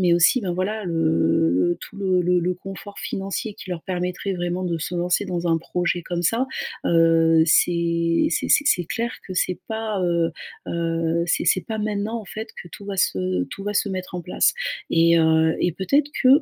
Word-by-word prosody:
mais 180 -2 +3
aussi 175 +9 +4
ben 185 -4 -2
voilà 200 +4 -2
le 160 - +2
le 170 - +2
tout - - -11
le 190 -2 +1
le 180 +1 +2
le 180 +1 0
confort 195 +2 -9
financier 195 +2 -4
qui 185 - -10
leur 170 -2 -4
permettrait 180 +1 -3
vraiment 175 +1 -2
de 170 -2 -1
se 165 - -4
lancer 175 0 +1
dans 175 -1 -3
un 165 - +3
projet 175 +1 -2
comme 175 0 -3
ça, 230 +9 +1 0.4
heu, 165 -1 +4
c'est 170 - +2
c'est - - -1
c'est 290 - +4
c'est 180 - +3
clair 235 +6 -3
que 190 - -6
c'est 180 0 0
pas, 220 -2 -2
heu 170 -1 +1 0.4
heu, 165 0 0
c'est 175 - +1
c'est 185 - +3
pas 220 -1 -3
maintenant, 215 +2 -2
en 215 - -11
fait, 220 +4 -6
que 175 - -13
tout 200 - -10
va 200 -1 -5
se 90 - +1
tout 195 - -9
va 205 0 -2
se 205 - +1
mettre 185 -1 -5
en 180 - -2
place 180 - +2 0.4
et 170 0 +4
heu, 160 0 +3
et 175 - +1
peut-être 275 - +1
que 255 - +5
180 Hz, 205 wpm, -23 LUFS, 165-195 Hz, 0.4 s, que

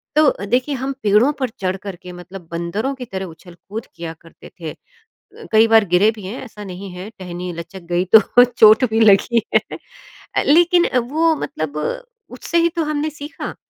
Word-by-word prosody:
तो 300 -9 +3
देखिए, 250 +7 0
हम 265 +2 -3
पेड़ों 210 +6 +4
पर 260 -2 -1
चढ़ 185 -1 0
कर 195 -1 -8
के 180 +1 -12
मतलब 180 0 -11
बंदरों 170 +10 -2
की 255 -1 -8
तरह 190 -4 -5
उछल-कूद 180 +5 -10
किया 165 -1 -6
करते 165 - -16
थे, 160 -2 -5 0.8
कई 220 +1 +5
बार 225 -1 +5
गिरे 205 +5 +5
भी 210 - -11
हैं, 205 +7 -6
ऐसा 215 -4 -10
नहीं 190 0 -8
है 180 +3 -8
टहनी 180 -1 -6
लचक 170 +3 -9
गई 175 +1 +1
तो 220 +3 +6
चोट 235 0 +5
भी 220 - +1
लगी 225 +2 +4
है। - - +8 0.8
अ, - - +2
लेकिन 345 +3 +4
वो 315 +7 +1
मतलब 155 - -5 0.5
उससे 340 - -3
ही 335 - +3
तो 335 - 0
हमने 305 0 -2
सीखा, 295 0 -8
215 Hz, 180 wpm, -19 LUFS, 180-260 Hz, 0.8 s, है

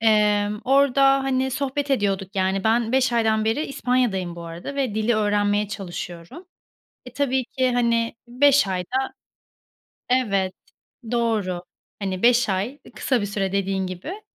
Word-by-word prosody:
Emm, 210 -1 +2
orada 275 0 +4
hani 265 0 0
sohbet 280 +2 -2
ediyorduk, 195 -6 0
yani, 190 +1 0
ben 230 +1 +2
5 260 -2 +2
aydan 220 -2 +2
beri 225 +8 0
İspanya'dayım 240 -10 -1
bu 170 - -7
arada 170 +11 -7
ve 260 -7 -1
dili 220 +2 +1
öğrenmeye 205 -1 +1
çalışıyorum. 180 - -7 0.6
E, 250 - -11
tabii 265 -2 0
ki, 255 0 0
hani, 235 -1 +1
5 280 +1 +4
ayda 195 +8 -2 1.0
Evet, 200 -7 +1 0.6
doğru, 215 -7 0 0.4
hani, 190 -1 -3
5 240 -2 +4
ay, 190 +3 0
ııı, 285 +1 -17
kısa 255 -4 0
bir - - -1
süre, 195 -1 -2
dediğin 195 -1 -1
gibi. 190 - -7
220 Hz, 140 wpm, -23 LUFS, 195-260 Hz, 1.0 s, orada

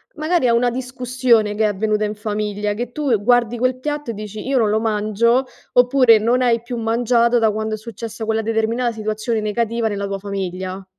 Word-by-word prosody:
magari, 315 -2 +1
a 235 - +3
una 240 +1 +2
discussione 250 -3 0
che 220 - 0
è - - +4
avvenuta 210 +1 0
in 210 0 -4
famiglia, 210 -1 -2
che 240 +3 -5
tu 280 -3 0
guardi 240 +1 +2
quel 255 +1 0
piatto 295 -1 -4
e - - -6
dici: 210 0 -7
"Io 270 0 +1
non 220 -4 +3
lo 215 +1 +2
mangio". 225 +3 +1 0.3
Oppure, 245 -2 +5
non 235 +4 +1
hai 235 -2 +2
più 240 +1 -6
mangiato 235 +1 +2
da 220 -1 +3
quando 220 +1 -2
è - - -8
successa 225 0 -7
quella 220 0 0
determinata 225 +2 0
situazione 215 +1 -2
negativa 230 +2 -1
nella 200 -2 -3
tua 195 0 -3
famiglia? 190 -1 -5
225 Hz, 195 wpm, -20 LUFS, 210-245 Hz, 0.3 s, Oppure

